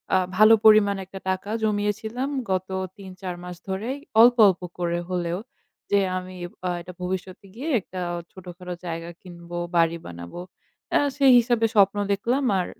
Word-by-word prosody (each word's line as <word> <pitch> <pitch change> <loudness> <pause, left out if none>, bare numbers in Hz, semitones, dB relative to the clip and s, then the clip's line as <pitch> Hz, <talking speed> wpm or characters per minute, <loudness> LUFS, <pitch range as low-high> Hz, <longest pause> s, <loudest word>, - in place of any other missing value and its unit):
আ - - +6 0.2
ভালো 215 +1 +8
পরিমাণ 215 -2 +7
একটা 190 +1 -9
টাকা 190 +2 -2
জমিয়েছিলাম 215 +5 -1 0.2
গত 185 0 -1 0.3
৩-৪ 185 -2 -7
মাস 180 0 -7
ধরেই 225 +9 -3 0.2
অল্প, 240 +1 +7
অল্প 185 -1 +1 0.2
করে 175 0 0
হলেও, 175 0 -2 0.5
যে, 200 - +5 0.2
আমি 185 0 -7 0.3
অ্যা 180 - 0
এটা 180 +1 -10
ভবিষ্যতে 185 +2 -5
গিয়ে 290 +7 -4
একটা 185 0 -8 0.3
ছোটখাটো 180 -1 -9
জায়গা 165 0 -5
কিনব, 175 -2 -13 0.2
বাড়ি 165 0 +3
বানাব। 85 0 -9 0.6
অ্যা - - +4 0.2
সেই 270 -2 +6
হিসাবে 235 -1 +2
স্বপ্ন 200 0 +5 0.2
দেখলাম 245 +7 0 0.2
আর 180 - 0
190 Hz, 150 wpm, -24 LUFS, 180-215 Hz, 0.6 s, ভালো